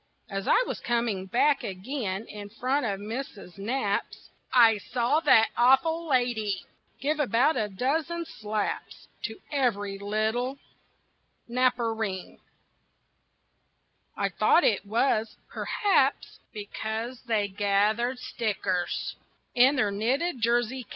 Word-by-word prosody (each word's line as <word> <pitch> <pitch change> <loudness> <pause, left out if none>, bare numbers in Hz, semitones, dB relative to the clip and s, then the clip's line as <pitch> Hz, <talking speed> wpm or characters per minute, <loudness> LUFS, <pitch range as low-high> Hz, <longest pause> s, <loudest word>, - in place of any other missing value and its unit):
As 195 0 -3
I - - +5
was - - -4
coming 230 -6 -1
back 275 +8 +2
again 195 +1 -4
In 205 -2 -9
front 255 +5 -1
of 195 -2 -2
Missus 210 -4 -7
Knapp's 205 -1 -2 0.2
I 230 -4 +6
saw 245 +7 +1
that 225 -8 +5
awful 295 +7 +3
lady 240 -7 0 0.3
Give 300 +5 -1
about 275 +2 +3
a 210 -1 -1
dozen 310 - -1
slaps 215 -6 -4 0.2
To 220 - -4 0.2
every 205 -8 0
little 220 +6 -1 0.9
Knapperine 230 -5 -1 1.8
I - - 0
thought 350 - +3
it 205 -2 +1
was, 220 0 +1
perhaps, 405 -2 0
Because 220 +3 -5
they 215 -3 +1
gathered 205 +5 +1
stickers 200 -7 -2 0.4
In 260 +3 +5
their 215 -6 +1
knitted 255 - -1
jersey 240 +2 +1
caps. 235 - -15
230 Hz, 110 wpm, -27 LUFS, 205-260 Hz, 1.8 s, I